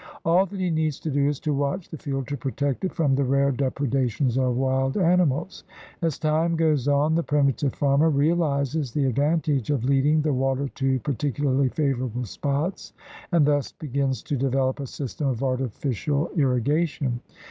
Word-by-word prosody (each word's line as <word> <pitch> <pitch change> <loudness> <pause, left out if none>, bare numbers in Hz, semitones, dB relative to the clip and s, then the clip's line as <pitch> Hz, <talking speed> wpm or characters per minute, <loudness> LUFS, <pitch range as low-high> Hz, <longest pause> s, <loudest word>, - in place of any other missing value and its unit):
All 175 +4 +4
that 195 +1 -7
he 180 -2 0
needs 155 -3 0
to 155 - -3
do 140 0 +2
is 145 -1 -1
to 150 - -1
watch 145 +6 -1
the 160 - -7
field 135 -3 -3
to 145 - -2
protect 135 +2 -2
it 185 - 0
from 150 -6 +1
the 140 +1 +2
rare 140 +1 +2
depredations 130 -2 0
of 130 -2 +1
wild 135 +2 0
animals. 175 -3 +1 0.4
As 165 -4 0
time 160 +2 +1
goes 155 -5 +1
on 145 +2 +3
the 165 - +2
primi 145 -4 +2
tive 140 -1 -2
farmer 140 +3 +3
realizes 145 -2 +1
the 140 +2 0
advantage 145 0 +1
of 140 -6 0
leading 140 +3 +3
the 150 -2 +1
water 135 +1 0
to 135 -1 0
particularly 140 0 0
favorable 125 -4 -1
spots 145 - -3 0.4
and 170 -4 +4
thus 145 -1 +1
be 155 - -8
gins 135 -2 -1
to 145 - -2
develop 135 +1 0
a 140 - -4
system 140 +2 -4
of 130 -1 -1
artificial 135 - -1
irrigation. 140 -1 +1
140 Hz, 175 wpm, -24 LUFS, 130-155 Hz, 0.4 s, All